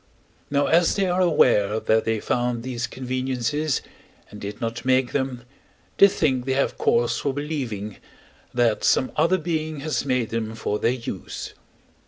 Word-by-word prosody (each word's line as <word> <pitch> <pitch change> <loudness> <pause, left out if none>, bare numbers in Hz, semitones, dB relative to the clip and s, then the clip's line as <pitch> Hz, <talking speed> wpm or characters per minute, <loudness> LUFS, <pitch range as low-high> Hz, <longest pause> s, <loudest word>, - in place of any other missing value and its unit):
Now 145 0 +2
as 170 +1 +3
they 195 - +1
are 180 0 +1
aware, 110 - +3
that 110 0 +2
they 115 -1 0
found 120 +1 -1
these 120 -1 -3
conveniences 130 +2 -2 0.5
and 105 - -10
did 100 +1 -6
not 115 0 -3
make 130 -1 +2
them, 130 -3 -2 0.6
they 200 - +10
think 135 -9 0
they 135 - 0
have 140 - 0
cause 115 0 +2
for 140 -2 -2
believing, 125 -9 -4 0.5
that 120 -3 +1
some 130 - +3
other 165 +5 +3
being 155 -3 -3
has 155 +1 -1
made 125 -4 0
them 110 -1 -3
for 105 -1 -2
their - - +2
use. 125 -2 -6
130 Hz, 160 wpm, -24 LUFS, 115-150 Hz, 0.6 s, they